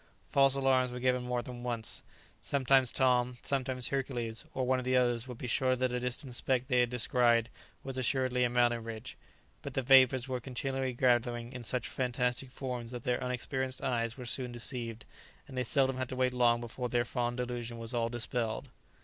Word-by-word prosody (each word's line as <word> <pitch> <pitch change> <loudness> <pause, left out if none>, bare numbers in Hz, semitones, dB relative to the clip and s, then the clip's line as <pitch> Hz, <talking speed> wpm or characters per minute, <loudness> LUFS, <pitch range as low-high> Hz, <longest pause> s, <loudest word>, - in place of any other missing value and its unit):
False 135 -1 +4
alarms 130 -2 +2
were 125 - -5
given 125 0 +2
more 125 -1 -2
than 120 0 -8
once. 120 -2 0 0.4
Sometimes 135 -2 +3
Tom, 125 -1 +2
sometimes 130 -2 -1
Hercules, 120 -4 -2
or 130 - 0
one 130 0 +2
of - - -4
the 130 0 +2
others 120 -1 +1
would 125 -2 -7
be - - -6
sure 130 +2 +2
that 130 0 0
a 125 - -1
distant 125 +1 -3
speck 125 +1 +1
they 125 -2 +2
had 120 -1 +3
descried 120 -1 +2 0.3
was 135 -1 -3
assuredly 130 0 +1
a 120 - +3
mountain 120 -1 +2
ridge; 110 -1 -7 0.5
but - - -7
the 135 - 0
vapours 130 -1 +6
were 130 -1 -2
continually 130 +1 -3
gathering 120 -1 +1
in 125 - -6
such 125 +2 -2
fantastic 125 0 -1
forms 125 -3 -5
that 120 -1 -6
their 125 0 0
unexperienced 130 +1 -2
eyes 115 -3 -1
were 125 - -7
soon 125 +1 -1
deceived, 120 -1 -4 0.4
and 135 - -10
they 125 - 0
seldom 135 +1 +2
had 130 -1 -3
to - - -4
wait 130 0 +1
long 120 -1 +3
before 120 +1 -4
their 120 0 +1
fond 120 0 -2
delusion 120 -1 -4
was 115 +1 -2
all 115 -1 0
dispelled. 120 +1 -2
125 Hz, 195 wpm, -32 LUFS, 120-130 Hz, 0.5 s, vapours